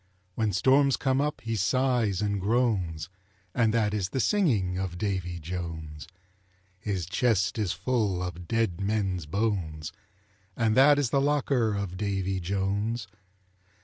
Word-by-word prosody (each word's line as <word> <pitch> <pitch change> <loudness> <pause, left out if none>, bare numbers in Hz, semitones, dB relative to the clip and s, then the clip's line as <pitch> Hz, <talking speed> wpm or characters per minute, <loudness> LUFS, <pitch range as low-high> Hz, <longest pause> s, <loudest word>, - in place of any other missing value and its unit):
When 110 +1 0
storms 135 +7 +4
come 135 0 +1
up 150 +1 -2
he 115 0 -2
sighs 115 -2 +1
and 100 -1 -1
groans, 95 -8 0 0.5
And 115 -2 +3
that 110 -2 +1
is 100 -3 -1
the 130 - -2
singing 115 - +2
of 95 -2 -3
Davy 95 -3 -2
Jones. 80 -3 -6 0.7
His 95 -3 -2
chest 105 +2 +1
is 100 -5 0
full 95 -1 0
of 90 -1 -6
dead 110 -4 0
men's 95 -5 -1
bones, 85 -6 -2 0.7
And 110 -2 +2
that 145 +2 +7
is 140 -5 0
the 140 - +3
locker 135 -6 +1
of 100 -3 -4
Davy 95 -1 -1
Jones. 100 +5 -1
100 Hz, 140 wpm, -28 LUFS, 90-115 Hz, 0.7 s, that